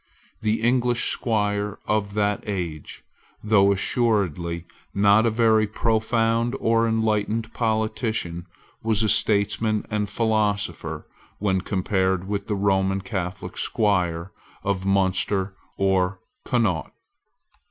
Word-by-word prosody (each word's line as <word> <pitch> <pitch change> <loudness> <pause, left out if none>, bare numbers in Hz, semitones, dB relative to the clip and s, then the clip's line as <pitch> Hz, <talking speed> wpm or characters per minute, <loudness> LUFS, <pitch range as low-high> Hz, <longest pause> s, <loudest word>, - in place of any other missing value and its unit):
The 110 0 0
English 120 0 +2
squire 105 -3 -1
of 105 -1 -1
that 105 -1 0
age, 85 -7 -5 0.4
though 100 -2 +4
assuredly 95 - 0 0.3
not 100 +3 +5
a - - +4
very 110 -1 +3
profound 115 +2 +1
or 115 0 +2
enlightened 110 0 0
politician, 110 -6 -1 0.3
was 110 -1 +1
a 110 - +2
statesman 105 0 +2
and 105 -1 0
a - - -11
philosopher 100 -8 -1 0.3
when 95 -2 0
compared 95 -1 0
with 100 -1 -3
the 105 - -1
Roman 95 -1 +1
Catholic 95 -5 -5
squire 90 -4 0 0.3
of 100 -1 -1
Munster 95 0 +1 0.2
or 95 0 +1 0.3
Connaught. 110 - 0
105 Hz, 110 wpm, -24 LUFS, 95-110 Hz, 0.4 s, not